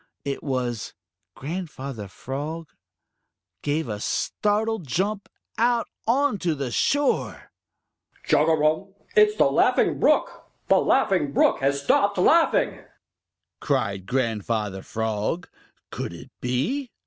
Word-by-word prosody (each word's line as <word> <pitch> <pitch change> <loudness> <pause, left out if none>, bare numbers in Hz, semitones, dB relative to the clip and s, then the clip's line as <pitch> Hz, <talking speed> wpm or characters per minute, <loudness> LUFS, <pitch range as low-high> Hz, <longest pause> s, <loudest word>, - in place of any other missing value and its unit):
It 140 -1 -3
was 125 -5 -3 0.4
Grand 170 +5 -5
father 130 -8 -7
Frog 145 - -6 0.9
gave 150 0 -1
a 105 -2 -4
startled 210 - -1
jump 200 - -1 0.3
out 235 0 +2 0.2
on 260 -2 +2
to 170 -3 0
the 135 -4 -4
shore. 285 - 0 0.7
"Chugarum! 160 +5 +2 0.2
It's 425 -1 +5
the - - +5
Laughing - - +3
Brook! - - +1 0.2
The - - +6
Laughing 185 - +2
Brook - - +3
has 140 +1 0
stopped 200 +7 +2
laughing!" 335 - +3 0.8
cried 100 -9 -1
Grandfather 110 -5 -1
Frog. 110 - -2 0.4
Could - - -5
it 85 - -11
be? 145 - -1
150 Hz, 110 wpm, -24 LUFS, 125-205 Hz, 0.9 s, The